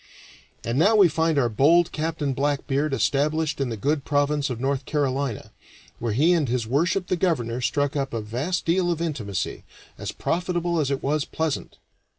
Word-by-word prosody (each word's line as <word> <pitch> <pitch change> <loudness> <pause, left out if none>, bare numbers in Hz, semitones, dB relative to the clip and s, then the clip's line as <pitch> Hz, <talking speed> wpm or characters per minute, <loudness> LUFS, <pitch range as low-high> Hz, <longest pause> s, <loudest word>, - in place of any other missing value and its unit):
And 120 +4 -1
now 205 +7 +5
we 200 -4 +7
find 160 0 +1
our 130 -4 +3
bold 155 +10 +4
Captain 155 -3 -2
Blackbeard 140 +1 0
established 145 +5 0
in 135 - 0
the 115 - -4
good 145 +6 0
province 145 0 +1
of 120 -3 -4
North 135 +1 -1
Carolina, 140 -5 -2 0.5
where 115 -2 -1
he 155 +10 +4
and 155 -7 +1
His 120 -2 0
Worship 170 - +1
the 185 - 0
Governor 130 -10 0
struck 145 +3 0
up 135 -2 -1
a 115 - -2
vast 125 +12 -3
deal 175 +1 +2
of 170 -2 -1
intimacy, 125 - -3 0.4
as - - -4
profitable 175 -1 -1
as 145 -3 0
it 140 -1 -2
was 145 +1 +1
pleasant. 160 -2 -3
145 Hz, 175 wpm, -24 LUFS, 130-165 Hz, 0.5 s, we